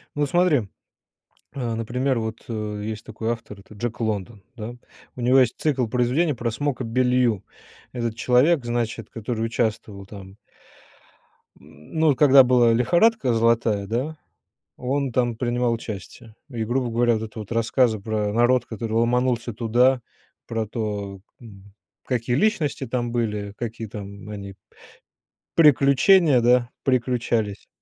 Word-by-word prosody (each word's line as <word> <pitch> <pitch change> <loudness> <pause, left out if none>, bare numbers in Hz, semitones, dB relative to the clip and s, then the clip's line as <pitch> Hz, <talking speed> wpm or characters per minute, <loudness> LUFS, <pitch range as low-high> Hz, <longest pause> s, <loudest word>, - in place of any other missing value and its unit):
Ну 145 0 +1
смотри. 155 - +2 0.9
Э, 120 -4 -3
например 125 +3 -1
вот, 110 0 -4
э, 105 -2 -4
есть 110 0 -5
такой 115 0 -4
автор- 105 -3 -8
это 105 - -16
Джек 120 +3 -5
Лондон, 105 -2 -3
да. 115 +2 -6 0.4
У 125 - -7
него 125 +2 +4
есть 125 -3 +2
цикл 135 -5 +1
произведений 125 +7 +1
про 120 0 -2
Смока 130 +1 -2
Беллью. 125 -2 +1 0.5
Этот 115 -3 -3
человек, 125 +5 +3
значит, 115 -2 -3
который 115 0 -3
участвовал 110 -3 -2
там. 100 -2 -11 1.3
М, 75 +1 -17
ну 155 -4 +4
когда 135 -1 +7
была 120 -2 +4
лихорадка 170 - +3
золотая, 115 -3 +2
да, 130 +9 -3 0.6
он 135 +1 -1
там 120 -1 0
принимал 120 0 0
участие. 110 0 -8
И, 115 -4 -3
грубо 125 +2 -1
говоря, 120 0 +2
это 110 +1 -6
вот 105 0 -9
рассказы 115 0 +2
про 105 0 -2
народ, 120 +1 +3
который 110 -1 -5
ломанулся 120 +1 +1
туда, 120 +3 +2 0.5
про 115 -1 -2
то, 105 -3 -4 0.2
м, 100 -3 -14 0.3
какие 120 -1 -1
личности 160 - 0
там 120 0 -2
были, 105 -4 -2
какие 115 -1 -5
там 100 0 -9
они, 100 -2 -8 1.0
приключения, 150 0 +5
да, 120 0 +3
приключались. 120 -5 -1
120 Hz, 135 wpm, -23 LUFS, 110-125 Hz, 1.3 s, когда